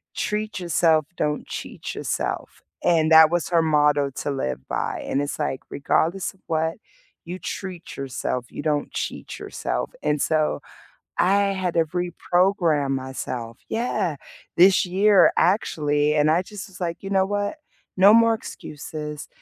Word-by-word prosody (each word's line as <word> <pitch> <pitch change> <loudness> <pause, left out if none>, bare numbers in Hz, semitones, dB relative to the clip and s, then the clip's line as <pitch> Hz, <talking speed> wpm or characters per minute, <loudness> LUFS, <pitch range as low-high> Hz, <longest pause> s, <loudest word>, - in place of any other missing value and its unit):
"Treat 210 -1 -2
yourself, 165 -3 +2
don't 150 -2 -1
cheat - - -6
yourself." - - -3 0.2
And 160 -2 +3
that 160 -1 +9
was 175 +2 -1
her 170 -2 +3
motto 150 -2 +3
to 135 +2 -4
live 65 - -3
by - - -2
and 140 - 0
it's 145 - -3
like, 145 -3 -2
regardless 170 +7 0
of 190 - -27
what, 160 0 0 0.5
you 180 +2 -6
treat 185 -4 -6
yourself, 125 -2 -3
you - - -6
don't 150 -2 0
cheat - - -5
yourself, - - -3
and 150 -1 +1
so 155 -1 +1 0.6
I 200 +2 +3
had 185 -2 -2
to 165 -1 +3
reprogram 175 -3 +1
myself 130 -3 -4
Yeah, 225 -8 -1 0.4
this 185 +2 +6
year 190 +1 +5
actually, 150 -6 +2
and 150 0 +4
I 165 +3 +3
just 205 +2 -9
was 190 - -14
like, 170 0 -3
you 195 - -5
know 190 -1 +3
what? 205 +7 -2 0.4
No 200 +3 +7
more 230 0 +6
excuses, 150 -6 -7
165 Hz, 150 wpm, -23 LUFS, 150-190 Hz, 0.6 s, that